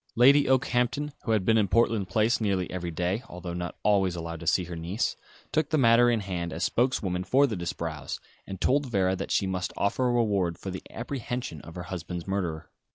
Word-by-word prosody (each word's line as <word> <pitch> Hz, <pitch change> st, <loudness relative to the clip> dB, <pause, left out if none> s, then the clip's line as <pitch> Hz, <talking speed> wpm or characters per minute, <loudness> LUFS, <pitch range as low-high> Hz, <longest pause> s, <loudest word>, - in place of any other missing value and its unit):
Lady 140 Hz, +4 st, +6 dB
Okehampton, 130 Hz, +2 st, +1 dB
who 115 Hz, -, 0 dB
had 105 Hz, -4 st, +2 dB
been 110 Hz, +1 st, +4 dB
in 105 Hz, -, +2 dB
Portland 115 Hz, -2 st, +2 dB
Place 115 Hz, +1 st, +2 dB
nearly 95 Hz, -4 st, 0 dB
every 90 Hz, -2 st, -3 dB
day 90 Hz, +6 st, -1 dB
although 90 Hz, 0 st, -6 dB
not 90 Hz, -1 st, -5 dB
always 95 Hz, -4 st, +3 dB
allowed 85 Hz, -1 st, -5 dB
to 85 Hz, -, -8 dB
see 90 Hz, -, +3 dB
her 85 Hz, 0 st, -6 dB
niece 85 Hz, +7 st, -2 dB, 0.4 s
took 155 Hz, -1 st, +1 dB
the 155 Hz, -, +2 dB
matter 120 Hz, -2 st, +6 dB
in 115 Hz, -3 st, +1 dB
hand, 90 Hz, -3 st, -3 dB
as 85 Hz, -, -3 dB
spokeswoman 100 Hz, -8 st, +1 dB
for 130 Hz, +9 st, +4 dB
the 115 Hz, -6 st, -2 dB
Disbrowes, 80 Hz, -4 st, -4 dB, 0.3 s
and 95 Hz, -2 st, -6 dB
told 140 Hz, +5 st, +2 dB
Vera 95 Hz, -5 st, +1 dB
that 95 Hz, -, -5 dB
she -, -, +2 dB
must 95 Hz, -1 st, -2 dB
offer 125 Hz, +5 st, +1 dB
a -, -, +2 dB
reward 100 Hz, -8 st, +1 dB
for 95 Hz, -, -6 dB
the 95 Hz, -, -6 dB
apprehension 125 Hz, -, -5 dB
of 85 Hz, -, -12 dB
her 90 Hz, -, -5 dB
husband's 90 Hz, -1 st, -5 dB
murderer. 90 Hz, -5 st, -3 dB
95 Hz, 210 wpm, -27 LUFS, 90-120 Hz, 0.4 s, Lady